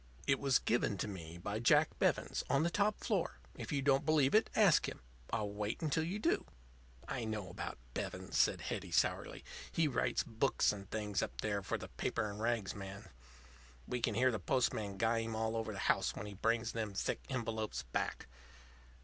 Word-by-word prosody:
It 135 - +3
was 135 -4 +4
given 115 -3 +1
to 95 - -2
me 85 -4 -7
by 100 +5 -3
Jack 150 +6 +5
Bevens, - - +1
on 140 +2 +3
the 170 - +1
top 205 +2 +2
floor. 200 -7 0 0.2
If - - -6
you 140 -2 0
don't 135 -1 +4
believe 150 -4 +3
it, 220 - +5
ask 200 -7 +5
him. - - -9 0.3
I'll 105 -3 -1
wait 105 +1 -2
until 155 +1 +2
you 180 +5 -2
do." 325 +11 +1 0.6
"I 125 -3 -2
know 110 -3 -3
about - - -5 0.2
Bevens," - - -4
said - - +4
Hetty, - - -4
sourly. - - +1 0.3
"He 165 -2 +2
writes 135 - +1
books 115 +5 +2
and 100 -2 -8
things 105 -2 -1
up - - -3
there 105 -2 0
for - - -2
the - - -7
paper 110 - -2
and 105 0 -6
rags 115 -5 0
man. 100 +1 -8 0.8
We 125 -1 -2
can 110 -2 +1
hear 130 +3 +4
the 110 - -2
postman 105 -3 0
guy 115 +1 +2
him 115 0 -3
all 110 +1 0
over 115 -1 -2
the 100 - -6
house - - +2
when 105 - -5
he 105 - -7
brings 115 +3 +1
them 110 -3 -3
thick - - -1
envelopes 115 -4 -2
back. - - -2
115 Hz, 195 wpm, -36 LUFS, 105-135 Hz, 0.8 s, Jack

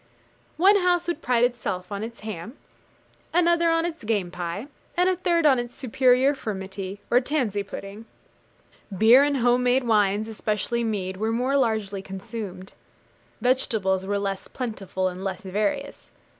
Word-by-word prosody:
One 390 +5 +6
house 360 -2 +2
would 345 -2 -2
pride 245 -1 +2
itself 210 -7 -1
on 200 +1 -3
its 230 +1 -8
ham, 215 - -7 0.8
another 340 -1 +4
on 330 0 +2
its 335 -5 -5
game 205 -5 -1
pie, 175 +5 -4 0.3
and 360 +1 +4
a 370 - +3
third 340 -2 +1
on 270 -4 +5
its 240 0 -6
superior 255 +2 +3
furmity, 195 -5 -5
or 245 - +5
tansey 250 -7 -1
pudding. 200 +2 -8 0.9
Beer 230 +6 +7
and 285 -1 +2
home 245 0 +3
made 250 +1 +3
wines, 210 -2 +2
especially 220 +2 -2
mead, 190 -4 -2
were 220 +3 -1
more 250 +4 0
largely 220 -7 0
consumed. 195 -1 -7 0.7
Vegetables 210 -7 +1
were 205 0 0
less 195 -1 -3
plentiful 200 -7 -3
and 185 +1 -5
less 190 -2 -3
various. 245 +9 -3
225 Hz, 150 wpm, -25 LUFS, 195-265 Hz, 0.9 s, Beer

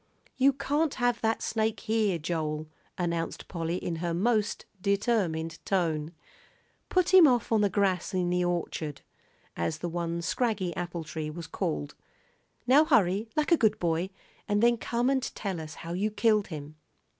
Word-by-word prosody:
"You 270 +1 +5
can't 285 +3 0
have 245 -2 +1
that 225 0 0
snake 220 0 -1
here, 215 -5 +1
Joel," 155 -1 -3 0.3
announced 170 -2 -2
Polly, 170 0 -2
in 170 -2 -3
her 170 0 -2
most 215 +2 +1 0.2
determined 195 -6 0
tone. 165 -4 0 0.8
"Put 365 0 +2
him 365 -4 +9
off 245 -3 +1
on 220 -2 +4
the 205 - +3
grass 190 -2 +1
in 180 -2 0
the 180 0 +2
orchard," 160 -4 -2 0.5
as 85 -1 -1
the 175 - -4
one 170 0 -3
scraggy 200 -6 -1
apple 175 -1 -4
tree 155 0 -5
was 165 +2 -7
called. 75 - -3 0.7
"Now 270 +5 +6
hurry, 215 - +2
like 305 +2 +1
a 335 - +7
good 215 -4 +3
boy, 170 +1 0 0.4
and 205 +1 +1
then 235 0 +5
come 240 +2 -1
and 270 0 +2
tell 195 -8 -4
us 155 0 -8
how 170 0 -6
you 200 +4 0
killed 215 -1 +2
him." 150 -2 -8
185 Hz, 165 wpm, -28 LUFS, 165-225 Hz, 0.8 s, him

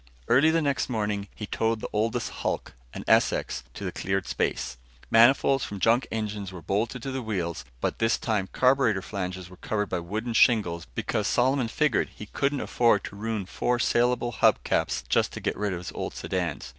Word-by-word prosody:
Early 140 +6 +5
the 165 0 +2
next 140 -2 0
morning, 105 -3 -1
he 105 - -5
towed 115 +1 0
the - - -5
oldest 110 +1 0
hulk, - - -2 0.2
an - - -7
Essex, - - +2
to - - -6
the - - -2
cleared 95 +1 -2
space. 65 - -2 0.3
Manifolds 130 +3 +5
from 100 - -5
junk 115 +5 +3
engines 105 -3 -3
were 90 -3 -9
bolted 110 - -1
to 135 - -3
the 130 0 -3
wheels 85 - -3 0.2
but - - -1
this 115 0 +2
time 105 -5 -1
carburetor 125 -7 +3
flanges 95 -2 -4
were 90 0 -14
covered 105 0 -2
by 90 - -1
wooden 110 +7 -4
shingles 100 -8 +3
because 105 - -1
Solomon 130 0 +2
figured 150 +6 +1
he 105 - -8
couldn't 140 +6 -1
afford 115 -4 +2
to - - -7
ruin 110 -1 -3
four 120 +6 0
salable 120 0 +2
hub 110 - +3
caps - - 0
just - - +2
to - - -5
get - - -2
rid 105 0 -1
of 90 - -2
his 90 -3 -7
old - - -5
sedans. 90 -5 -3
110 Hz, 195 wpm, -27 LUFS, 95-120 Hz, 0.3 s, Early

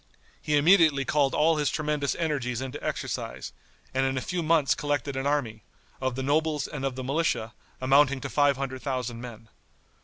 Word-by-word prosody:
He 150 -1 +1
immediately 155 -3 +5
called 140 0 +1
all 160 +1 +3
his 150 -2 +1
tremendous 150 -2 -1
energies 140 -7 -2
into 130 +2 -6
exercise, - - -4 0.4
and 135 0 +1
in 135 0 0
a - - +2
few 180 +4 -2
months 155 -6 +3
collected 145 +1 -2
an 135 +1 -1
army, 120 -7 -1 0.4
of 130 -1 -1
the 130 - -3
nobles 150 +1 +1
and 140 -3 -6
of 135 -2 -1
the 130 - -5
militia, 130 -5 -1 0.3
amounting 135 +1 +4
to - - -4
five 145 -2 +3
hundred 130 -1 -4
thousand 125 -4 -3
men. 115 -2 -10
140 Hz, 180 wpm, -27 LUFS, 130-150 Hz, 0.4 s, immediately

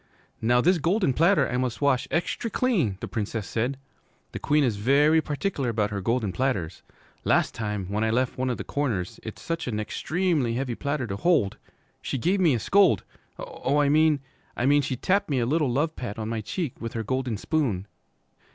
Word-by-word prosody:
'Now 120 +2 +3
this 180 +3 +3
golden 175 -2 +2
platter 170 +8 +3
I 125 - -2
must 125 -2 -2
wash 140 -3 +2
extry 175 +7 -1
clean,' 190 - +1
the - - -4
Princess 110 -1 -3
said. 125 +4 -1 0.5
'The - - -5
Queen 150 0 +2
is 115 -6 0
ve 135 +8 +3
ry 160 +1 +5
particular 150 -3 -2
about 110 -2 0
her 100 -1 -3
golden 115 0 0
platters. 95 -9 -2 0.4
Last - - +2
time, 105 -3 -3
when 105 +4 -1
I 110 - +1
left 125 +3 0
one 130 0 -1
o' 125 - 0
the - - -6
corners, 115 -7 -2
it's 110 - -8
such 165 -4 -3
a - - -1
nextremely 135 - -1
heavy 125 -1 -2
platter 140 +1 -2
to 100 -3 -4
hold, 155 - +2 0.4
she - - -3
gave 180 - +1
me 165 -8 +4
a - - -1
scold, 190 - +4 0.3
oh, 140 +3 -2
I 145 -1 +3
mean, 155 -1 +4 0.4
I 120 - 0
mean 145 +2 +5
she 130 -1 -2
tapped 190 - +1
me 140 - +1
a 120 - +1
little 150 +2 +1
love 150 +6 0
pat 120 -4 -5
on 110 0 -4
my 115 -1 -2
cheek 140 - -4
with 115 -1 -5
her 115 - -2
golden 130 -1 -2
spoon.' 115 - -1
130 Hz, 205 wpm, -26 LUFS, 110-155 Hz, 0.5 s, ry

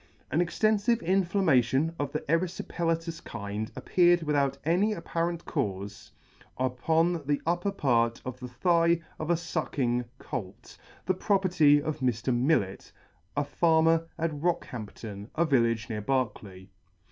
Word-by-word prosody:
An 155 - +1
extenfive 215 +5 +2
inflammation 165 - +2
of 145 -1 -2
the - - -2
eryfipelatous 165 0 -2
kind 100 +2 -5
appeared 175 -1 +3
without 145 -3 +1
any 185 +7 +2
apparent 170 -1 -3
caufe 100 - -4 0.5
upon 160 +7 +1
the 145 -1 +1
upper 175 +4 0
part 120 -7 +1
of 130 0 -6
the 125 - -6
thigh 170 +6 +2 0.2
of 155 - -4
a 170 - +4
fucking 135 -8 -1
colt, 105 -10 -7 0.3
the 185 - +2
property 180 -7 +3
of 155 +1 -3
Mr. 125 -1 0
Millet, 120 -7 0 0.5
a 145 - +2
farmer 165 +2 +3
at 165 0 -1
Rockhampton, 115 - -4
a 170 - +2
village 115 -6 +2
near 110 -2 -4
Berkeley. 105 -6 -3
150 Hz, 125 wpm, -28 LUFS, 120-170 Hz, 0.5 s, a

